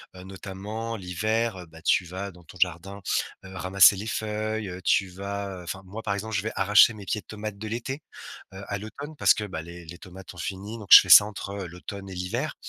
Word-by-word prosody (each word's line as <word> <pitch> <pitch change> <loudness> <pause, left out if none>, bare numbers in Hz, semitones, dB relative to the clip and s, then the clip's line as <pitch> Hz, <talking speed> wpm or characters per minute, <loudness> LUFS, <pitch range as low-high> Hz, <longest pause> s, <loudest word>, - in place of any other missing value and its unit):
heu, 90 - -10
notamment 100 +4 -6
l'hiver, 105 +1 -2
bah, 80 0 -14
tu 90 - +2
vas 95 +3 -6
dans 90 0 -17
ton 90 - -14
jardin, 95 +3 -1 0.4
heu, 95 - -11
ramasser 95 +2 +6
les 105 +3 -6
feuilles, 110 -1 -3
heu, 90 +1 -8
tu 95 +2 +2
vas 100 0 -5
enfin 95 +2 -6
moi, 105 +4 -7
par 100 - -2
exemple, 110 +2 -4
je 100 - +1
vais 110 - -3
arracher 105 +3 +6
mes 105 -2 -10
pieds 105 - -1
de - - -39
tomates 105 -1 -6
de 110 +2 -6
l'été, 120 +6 -4 0.5
heu, 95 - -8
à 100 - -3
l'automne 140 +9 -8
parce - - +5
que, 105 - -4
bah, 85 -5 -5
les 85 +1 -10
les 85 +2 -10
tomates 95 0 -11
ont - - -17
fini, 100 +6 -5
donc 105 - -11
je - - +14
fais - - -6
ça - - +11
entre, 105 -1 -7
heu, 100 -2 -5
l'automne 95 +3 -9
et 95 - -8
l'hiver. 90 0 -3
100 Hz, 230 wpm, -26 LUFS, 90-110 Hz, 0.5 s, je